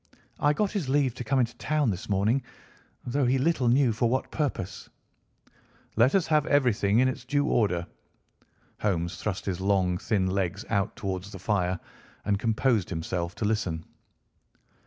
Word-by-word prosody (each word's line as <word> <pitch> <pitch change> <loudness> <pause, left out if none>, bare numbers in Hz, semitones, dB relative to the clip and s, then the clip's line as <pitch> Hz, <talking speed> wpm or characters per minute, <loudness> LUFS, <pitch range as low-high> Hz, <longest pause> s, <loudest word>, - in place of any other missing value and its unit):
I 145 - +4
got 205 +5 0
his 180 -11 -2
leave 135 -3 +2
to 125 - -6
come 135 +2 +1
into 120 -2 0
town 150 -5 +1
this 95 +2 -6
morning, 105 +7 +2 0.6
though 130 +1 +1
he 130 +2 +3
little 135 -2 +1
knew 125 0 +4
for 115 +2 +1
what 130 +2 -1
purpose." 100 - -3 1.1
"Let 120 - +4
us 190 -4 +3
have 155 -2 +2
everything 115 -7 +3
in 130 +2 +5
its 130 -1 -3
due 145 +2 +1
order." 100 - +1 0.9
Holmes 85 -4 -1
thrust 105 -3 -3
his 95 -2 -2
long 95 -2 +2
thin 105 -5 0
legs 95 +1 -1
out 100 +2 0
towards 95 0 -4
the 95 - -7
fire 90 -2 0 0.5
and 100 -1 +1
composed 115 -2 +1
himself 85 +1 -3
to 105 - -2
listen. 95 -7 -1
110 Hz, 160 wpm, -27 LUFS, 95-130 Hz, 1.1 s, in